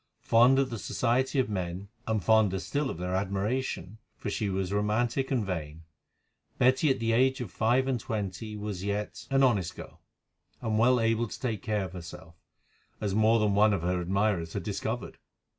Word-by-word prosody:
Fond 120 +4 +5
of 135 -2 +1
the 115 - -4
society 130 +7 0
of 130 - +3
men, 95 -1 -4 0.2
and 110 -3 0
fonder 110 -3 +4
still 140 +8 -2
of - - -5
their 90 +1 -3
admiration, 100 +1 -2 0.2
for 100 - -4
she 105 0 -1
was 95 0 -2
romantic 115 +6 0
and 125 -6 0
vain, 80 -4 -5 0.7
Betty 130 +4 +4
at 135 - +2
the 115 0 0
age 130 +3 +3
of 120 -7 -5
five 125 +4 +2
and 130 -3 0
twenty 105 0 -4
was 105 -3 -5
yet 100 +1 -3
an 135 0 +3
honest 100 -10 +2
girl, - - -11 0.6
and 110 -1 -1
well 125 +2 +4
able 115 +1 +1
to - - -8
take 115 -6 -2
care 105 -3 -1
of 90 - -9
herself, 90 -1 -9 0.7
as 100 -2 -2
more 110 +2 +4
than 105 -2 +2
one 105 +1 +4
of 90 -4 -1
her 90 0 0
admirers 95 -2 0
had - - -3
discovered. 110 -1 -4
105 Hz, 185 wpm, -29 LUFS, 95-120 Hz, 0.7 s, Fond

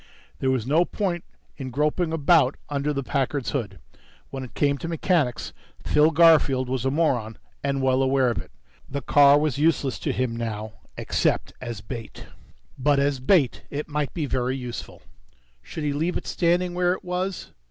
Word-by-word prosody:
There 130 - 0
was 130 -4 0
no 155 +6 +3
point 180 -2 -2 0.3
in 135 -2 -5
groping 150 +6 0
about 155 -3 +3
under 145 +1 -1
the 140 -1 -2
Packard's 135 0 -1
hood. 105 -9 -3 0.5
When 135 -1 -5
it 130 - -11
came 140 -1 +1
to - - -5
mechanics, 165 -6 0 0.3
Phil 150 +1 +4
Garfield 155 -5 +4
was 130 -1 -2
a - - +3
moron 130 -7 0 0.3
and 140 -1 -1
well 130 0 +3
aware 130 -2 +3
of 115 - -3
it. - - -10 0.4
The 140 0 -4
car 145 +1 +6
was 150 -2 0
useless 145 -4 +1
to - - -1
him 125 -2 -1
now... 110 -2 -4 0.2
except - - 0
as 120 -5 -6
bait. 115 0 -8 0.5
But 145 +2 +3
as 140 -1 +1
bait 135 -1 +2
it 145 +1 -4
might 150 -2 -2
be 160 -4 -1
very 130 -1 -1
useful. 125 -2 -7 0.6
Should 160 - -7
he 145 -1 0
leave 160 +5 -1
it - - -8
standing 175 +1 +1
where 180 0 +2
it - - -7
was? 180 +1 -3
140 Hz, 175 wpm, -24 LUFS, 130-160 Hz, 0.6 s, car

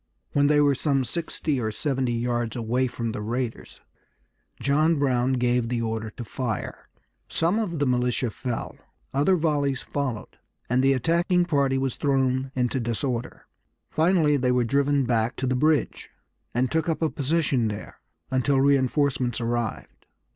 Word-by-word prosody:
When 145 0 +3
they 150 0 +4
were 145 -1 +4
some 140 -1 +1
sixty 150 +1 -2
or 110 - -1
seventy 130 +1 -1
yards 120 -1 -1
away 125 +2 0
from 115 -2 -4
the 105 - -5
raiders 120 +2 -4 0.8
John 155 +4 +2
Brown 130 -2 +1
gave 125 -2 +1
the 120 -1 -1
order 110 -1 -3
to 120 +3 -8
fire. 115 -2 -4 0.4
Some 175 +7 +1
of 185 -7 -2
the 145 - +1
militia 125 -1 0
fell. 125 +1 -5 0.4
Other 145 +8 +3
volleys 145 -5 0
followed; 130 -7 -4 0.3
and 125 +2 +2
the 135 +1 +4
attacking 170 +6 +2
party 140 -5 +1
was 135 -2 -2
thrown 130 -2 +1
into 125 +1 0
disorder. 120 +1 -3 0.5
Finally 160 -3 +3
they 125 -1 +1
were 125 -1 +2
driven 140 +2 +2
back 115 -1 0
to 130 - -3
the 130 0 +1
bridge, 150 +3 +1 0.4
and 125 +2 0
took 160 +1 0
up 165 0 -1
a 160 - +2
position 140 -4 +1
there 105 0 -7 0.3
until 135 +1 +2
reinforcements 135 -3 +2
arrived. 120 -1 -3
130 Hz, 155 wpm, -25 LUFS, 120-145 Hz, 0.8 s, they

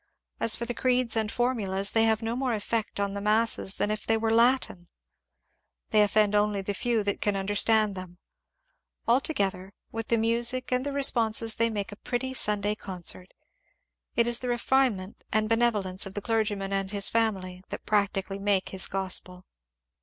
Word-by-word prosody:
As 230 - +4
for 235 - -4
the 245 - -4
creeds 250 -1 +1
and 220 -1 0
formulas, 200 -6 0
they 225 0 +3
have 220 0 +1
no 225 +1 -2
more 255 -2 -1
effect 220 0 -2
on 200 -1 -1
the 200 - -5
masses 215 -1 +2
than 210 - -1
if 215 - -4
they 225 - +3
were 225 0 -1
in - - +3
Latin; 235 -7 +2 1.0
they 215 - +5
offend 210 0 +2
only 205 -1 +1
the 205 - -3
few 230 +1 -1
that 200 -1 -2
can 205 -1 0
understand 205 +2 +2
them; 185 -2 -9 0.9
altogether, 200 -7 0 0.2
with 225 0 -5
the 235 - +2
music 235 +3 +1
and 250 0 +1
the 285 - -3
re 280 0 -2
sponses 225 -3 +2
they 230 0 +2
make 210 -1 -4
a - - -8
pretty 260 +3 -3
Sunday 210 -4 +2
concert. 185 -2 -5 0.8
It 235 - +3
is 240 0 +2
the 250 - -4
refine 245 -1 +2
ment 185 +2 -11
and 215 0 +2
the - - -6
benevolence 205 -5 0
of 195 - -11
the 205 - -3
clergyman 205 -4 -1
and 195 -1 -1
his 200 -1 +2
family 190 -5 -1
that - - -7
practically 200 -2 -1
make 200 -1 +1
his 190 -1 +1
gospel. 185 -1 -2
215 Hz, 185 wpm, -27 LUFS, 195-230 Hz, 1.0 s, they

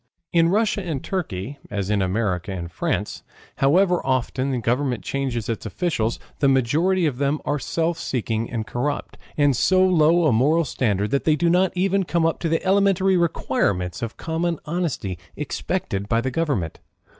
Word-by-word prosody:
In 165 -1 +4
Russia 210 +1 +1
and 160 -7 -4
Turkey 145 - -4
as 100 -1 -2
in 105 -2 +2
America 95 -1 -1
and 85 -2 -5
France, - - -2 0.4
however 180 +6 +3
often 130 0 0
the 130 - 0
government 125 +1 0
change 135 -3 -2
its 115 0 -3
officials, 120 -11 -1 0.2
the 140 - +3
majority 155 +8 +2
of 135 -5 -1
them 140 +2 +1
are 145 - 0
self 165 +5 -1
seeking 115 -2 -2
and 115 -2 -3
corrupt, 125 +6 -3 0.2
of 145 -2 +3
so 185 +9 +4
low 170 -1 +4
a 150 - +4
moral 150 +9 +3
standard 105 -6 0
that 140 - 0
they 155 - +4
do 170 +3 +2
not 180 +1 +3
even 195 +2 +2
come 170 -2 0
up 165 - 0
the 165 -1 -1
elementary 195 -1 +3
requirements 105 - 0
of 115 -1 -5
common 165 +1 -1
honesty 150 - -2 0.2
expected 100 +1 -3
by 115 - +3
the 130 +2 -2
government. 130 - -1
140 Hz, 170 wpm, -23 LUFS, 115-170 Hz, 0.4 s, In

